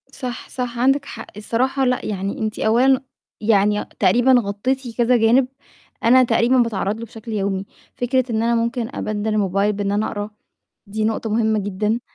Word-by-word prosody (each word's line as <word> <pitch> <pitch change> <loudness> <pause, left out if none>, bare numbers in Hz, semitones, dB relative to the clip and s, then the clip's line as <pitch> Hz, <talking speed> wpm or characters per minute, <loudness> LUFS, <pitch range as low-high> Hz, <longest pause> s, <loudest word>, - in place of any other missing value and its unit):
صح، 250 -3 -7
صح، 245 -2 -4
عندِك 270 +3 +2
حق. - - -8
الصراحة 260 +5 0
لأ، 250 0 0
يعني 200 -1 -3
أنتِ 215 -1 -3
أولًا 255 +4 +3 0.4
يعني 210 -1 +2
تقريبًا 245 +2 +4
غطّيتِ 235 +4 -3
كذا 245 +1 +4
جانب 240 +3 +4 0.6
أنا 255 +3 +6
تقريبًا 245 +1 +3
باتعرَّض 215 -4 +1
له 230 - -5
بشكل 225 +1 -10
يومي. 195 -2 -1 0.3
فكرة 255 +1 +1
إن 220 0 0
أنا 235 0 +2
ممكن 235 0 -1
أبَدِّل 215 0 -3
الموبايل 205 -1 +1
بإن 200 0 -2
أنا 210 +2 0
أقرا، 205 0 -4 0.6
دي 215 +2 -3
نقطة 220 0 -1
مهمة 220 0 +2
جدًا. 210 +3 -1
225 Hz, 165 wpm, -21 LUFS, 210-245 Hz, 0.6 s, أنا